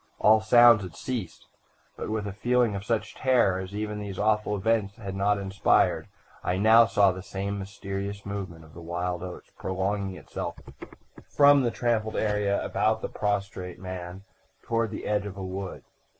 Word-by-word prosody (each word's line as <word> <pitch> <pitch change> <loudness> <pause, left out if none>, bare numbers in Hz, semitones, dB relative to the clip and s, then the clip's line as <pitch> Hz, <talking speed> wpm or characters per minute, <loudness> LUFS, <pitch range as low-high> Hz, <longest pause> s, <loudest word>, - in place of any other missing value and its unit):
All 110 +1 +5
sounds 120 0 +7
had 90 -4 -8
ceased, 105 -4 -5 0.5
but, - - -5
with 110 -1 -2
a 100 - -4
feeling 120 +1 +1
of 100 0 -4
such 110 0 -2
terror 120 -8 +2
as 95 +1 -7
even 105 0 -3
these 100 -2 -6
awful 105 0 +1
events 100 0 0
had 100 -4 -7
not 100 +1 +2
inspired, 100 0 +2 0.4
I 90 - 0
now 110 +3 +6
saw 100 -3 +4
the 95 +1 -7
same 100 +1 -4
mysterious 100 +1 -5
movement 95 -5 -6
of 80 - -18
the 85 - -10
wild 90 +1 -3
oats 90 -1 -8
prolonging 95 +1 -2
itself 80 - -6 0.7
from 145 -1 +6
the 120 - +1
trampled 115 -2 -1
area 105 -2 0
about 110 +2 0
the - - -2
prostrate 100 -3 -3
man 90 0 -7 0.4
toward 115 -2 0
the 105 - -6
edge 105 -1 0
of 100 -1 -8
a 95 - -5
wood. 95 0 -6
100 Hz, 170 wpm, -27 LUFS, 95-110 Hz, 0.7 s, sounds